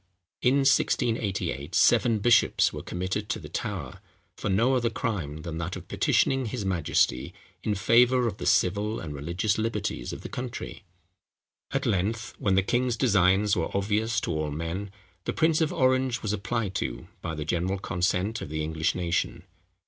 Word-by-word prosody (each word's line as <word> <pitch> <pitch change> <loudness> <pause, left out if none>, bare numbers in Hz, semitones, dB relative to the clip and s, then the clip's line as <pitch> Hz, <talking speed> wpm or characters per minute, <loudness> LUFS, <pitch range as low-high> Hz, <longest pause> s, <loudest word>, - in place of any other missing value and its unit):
In 125 +2 +4
1688, 105 - +1
seven 115 -2 +4
bishops 115 +3 +4
were - - -5
committed 95 +4 -3
to - - 0
the - - -9
Tower, - - -4 0.4
for - - -3
no 115 +7 +3
other 120 -2 +1
crime 90 - -3
than 85 -1 -5
that 85 +2 -3
of - - -9
petitioning 135 -2 +2
his 110 -2 -4
majesty 85 -3 +1 0.3
in 105 +1 -1
favour 120 +5 +4
of 105 -3 -3
the - - -4
civil 105 +4 +2
and 75 -3 -6
religious 85 +9 -1
liberties 110 - -2
of - - -7
the - - -6
country. 125 -1 -6 0.9
At - - -1
length, 110 +5 -1
when 100 -8 +2
the 95 - +3
king's 120 +3 0
designs 100 +1 +3
were 85 - -1
obvious 110 +4 +1
to - - -2
all 75 -1 -1
men, 85 +7 -4 0.4
the - - -1
prince 160 0 +2
of 155 - +2
Orange 130 -2 +1
was 105 -1 -1
applied 100 0 -2
to - - -4
by 80 -2 -4
the 75 -1 -4
general 90 +4 0
consent 95 +4 -1
of - - -6
the 80 0 -2
English 80 +1 -1
nation. 85 -2 -1
100 Hz, 170 wpm, -27 LUFS, 85-115 Hz, 0.9 s, In